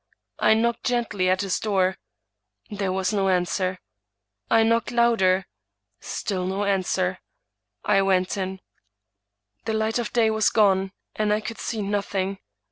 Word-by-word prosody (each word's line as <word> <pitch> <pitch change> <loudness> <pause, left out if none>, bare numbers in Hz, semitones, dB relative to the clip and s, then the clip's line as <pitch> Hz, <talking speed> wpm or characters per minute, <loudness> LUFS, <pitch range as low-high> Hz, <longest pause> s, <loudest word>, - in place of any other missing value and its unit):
I 220 - +5
knocked 235 +1 0
gently 230 -7 0
at 185 +1 +2
his 195 -2 -1
door; 190 -3 +1 0.8
there 200 -2 -2
was 190 +2 -1
no 195 -2 +1
an 180 -1 +2
swer. 185 0 -2 0.7
I 225 - +5
knocked 230 0 +1
louder; 225 -6 +3 0.5
still 185 -3 -3
no 195 +2 -1
answer. 185 -2 0 0.7
I 200 -1 +4
went 190 -1 +1
in. 190 -1 -4 1.0
The 220 - -1
light 220 +2 0
of 235 - -3
day 225 -2 +3
was 220 -1 +2
gone, 195 -3 +3 0.2
and 215 -1 0
I 210 - +2
could 220 +1 -7
see 220 -3 -3
nothing. 195 -1 -2
200 Hz, 145 wpm, -24 LUFS, 190-220 Hz, 1.0 s, I